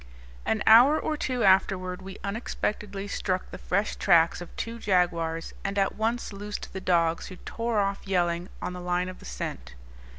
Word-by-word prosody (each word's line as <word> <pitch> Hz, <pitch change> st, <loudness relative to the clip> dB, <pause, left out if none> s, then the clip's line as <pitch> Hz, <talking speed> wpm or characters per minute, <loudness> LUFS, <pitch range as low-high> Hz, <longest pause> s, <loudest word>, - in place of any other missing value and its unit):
An 215 Hz, -2 st, +1 dB
hour 250 Hz, +8 st, +8 dB
or 310 Hz, -, -1 dB
two 255 Hz, -5 st, -1 dB
afterward 190 Hz, -1 st, +3 dB
we 190 Hz, +1 st, -8 dB
unexpectedly 205 Hz, -1 st, -3 dB
struck 185 Hz, -2 st, -2 dB
the -, -, -8 dB
fresh 200 Hz, +3 st, 0 dB
tracks 170 Hz, 0 st, +4 dB
of 175 Hz, -, -8 dB
two 230 Hz, 0 st, -4 dB
jaguars 170 Hz, -5 st, 0 dB
and 200 Hz, +1 st, -2 dB
at 195 Hz, -1 st, +2 dB
once 225 Hz, 0 st, -2 dB
loosed 205 Hz, +1 st, -6 dB
the 190 Hz, -, -5 dB
dogs, 170 Hz, -3 st, +1 dB
who 185 Hz, -, -9 dB
tore 230 Hz, +3 st, -2 dB
off 200 Hz, 0 st, -1 dB
yelling, 175 Hz, -1 st, 0 dB
on -, -, -3 dB
the 180 Hz, -, -7 dB
line 180 Hz, +1 st, 0 dB
of 185 Hz, -, -9 dB
the -, -, -13 dB
scent. -, -, -6 dB
195 Hz, 175 wpm, -27 LUFS, 180-210 Hz, -, hour